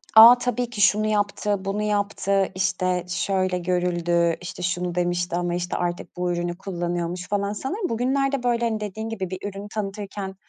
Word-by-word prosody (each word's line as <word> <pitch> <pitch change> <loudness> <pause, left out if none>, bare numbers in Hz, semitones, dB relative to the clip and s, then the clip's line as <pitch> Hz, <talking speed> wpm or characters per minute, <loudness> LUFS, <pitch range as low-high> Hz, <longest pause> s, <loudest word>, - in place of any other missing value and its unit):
A, 230 +3 +11
tabii 245 0 -1
ki, 225 -4 -4
şunu 210 +1 +4
yaptı, 205 -1 0
bunu 200 +2 -1
yaptı, 200 -2 +1
işte, 185 -1 0
şöyle 185 0 0
görüldü, 175 -1 +1
işte, 180 0 -7
şunu 180 0 -1
demişti 175 0 0
ama, 175 0 -1
işte, 175 0 -2
artık 175 0 -3
bu 180 0 0
ürünü 175 0 -2
kullanıyormuş 175 -1 -3
falan. 200 0 0
Sanırım 360 - -3
bugünlerde, 270 +3 0
böyle, 235 -1 +1
hani, 220 -2 0
dediğin 215 +1 -5
gibi 195 -5 -4
bir 185 0 -5
ürünü 200 +1 -8
tanıtırken 200 -2 -5
195 Hz, 165 wpm, -24 LUFS, 175-215 Hz, -, A